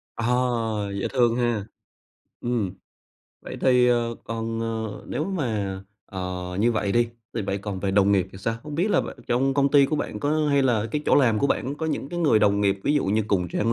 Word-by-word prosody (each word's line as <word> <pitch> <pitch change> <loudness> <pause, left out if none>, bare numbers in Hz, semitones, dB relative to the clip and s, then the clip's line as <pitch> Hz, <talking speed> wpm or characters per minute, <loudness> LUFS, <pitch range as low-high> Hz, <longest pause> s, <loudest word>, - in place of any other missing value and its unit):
À, 115 - -3 0.7
dễ - - -1
thương 120 -3 +3
ha. 120 -4 0 0.8
Ừm, 115 -6 -1 0.7
vậy - - -8
thì, 125 -1 +4
ờ, 120 -1 +1
còn, 115 0 -3
ờ, 110 -2 -4
nếu 150 - -2
mà, 110 - -2 0.3
ờ, 90 -2 -5 0.2
như 120 +2 +3
vậy 100 -2 -1
đi, 120 0 +2 0.3
thì 115 - -1
vậy 100 0 -2
còn 100 -2 -5
về 100 - 0
đồng 100 +1 +4
nghiệp 95 -2 +2
thì 95 - -10
sao? 115 +4 -1
Không 150 -1 -7
biết 180 +7 +1
là - - +4
bạn - - -7
trong 135 +3 +2
công 140 -1 +3
ty 140 -1 +6
của 155 - -1
bạn - - -4
có 150 +1 +1
hay 140 -1 +3
là 115 -4 +2
cái 150 +3 -2
chỗ - - +4
làm 115 -6 +4
của 140 - +2
bạn 140 0 -1
có 160 +1 -4
những 145 -3 -2
cái 175 - -4
người 150 -10 +4
đồng 100 -1 +3
nghiệp 100 -1 +1
ví 145 - +2
dụ 145 - +2
như 105 +3 +1
cùng 90 -4 +1
trang 115 +7 0
115 Hz, 225 wpm, -24 LUFS, 100-135 Hz, 0.8 s, ty